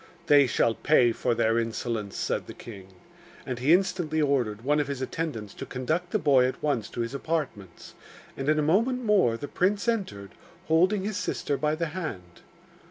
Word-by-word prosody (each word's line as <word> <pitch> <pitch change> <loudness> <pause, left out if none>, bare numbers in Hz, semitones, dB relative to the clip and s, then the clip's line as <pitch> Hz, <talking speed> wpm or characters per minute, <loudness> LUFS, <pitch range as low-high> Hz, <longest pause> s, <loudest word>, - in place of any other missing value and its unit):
'They 145 -2 +6
shall 115 -1 +2
pay 125 -2 +3
for 120 +1 -1
their 115 0 +2
insolence,' 115 -2 -3
said - - -2
the - - -9
king. 100 -5 -11 0.6
And 125 -3 -4
he 135 +5 +2
instantly 175 -3 +2
ordered 125 -7 0
one 150 +3 +2
of 145 - 0
his 140 -2 -4
attendants 130 -6 -4
to - - -7
conduct 155 +8 -2
the 215 - +1
boy 140 -8 +4
at 130 - -6
once 135 -8 0
to 120 - -4
his 115 +2 -3
apartments; 140 - -4 0.4
and 135 +2 -2
in 155 - +3
a 150 - +2
moment 230 - +1
more 190 - +3
the 145 - -6
prince 200 +7 0
entered, 145 - -2 0.4
holding 185 +5 +3
his 205 0 -3
sister 165 -5 -2
by 150 +2 0
the 165 0 -2
hand. 95 - -6
145 Hz, 185 wpm, -27 LUFS, 115-170 Hz, 0.6 s, They